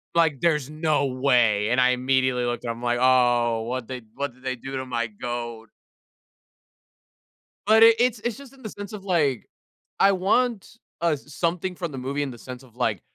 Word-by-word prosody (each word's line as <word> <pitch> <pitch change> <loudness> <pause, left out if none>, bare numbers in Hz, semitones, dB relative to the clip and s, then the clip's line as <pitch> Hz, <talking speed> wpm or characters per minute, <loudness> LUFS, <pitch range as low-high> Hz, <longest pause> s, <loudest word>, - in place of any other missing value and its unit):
Like, 160 -5 +2
there's 150 -5 +1
no 155 -2 0
way, 125 -6 +2
and 125 - +2
I 125 - +5
immediately 130 -1 +1
looked 120 0 -3
at 115 - -1
him, 115 - -7
I'm 120 - -11
like, 120 0 +1
"Oh, 120 -3 +3
what'd 120 0 -4
they 130 -1 -6
what 140 -3 -3
did 130 +1 -23
they 130 -1 -2
do 135 +3 -7
to 130 - -4
my 120 -2 -2
goat?" 120 +1 -6 2.0
But 220 +2 +6
it 230 0 +8
it's 245 -3 +2
it's 235 +2 -3
just 275 -2 -13
in 270 - -18
the 215 - -6
sense 205 +1 -9
of, 200 - -7
like, 150 - 0 0.5
I 195 - +6
want, 215 +4 0 0.2
uh, 170 - +3
s 145 +1 -16
something 180 +3 -1
from 170 -3 -4
the 135 - -7
movie 135 +3 -3
in 135 - -4
the 120 - -10
sense 125 +2 -9
of, 120 -3 -20
like, 115 -7 -1
130 Hz, 205 wpm, -24 LUFS, 120-175 Hz, 2.0 s, it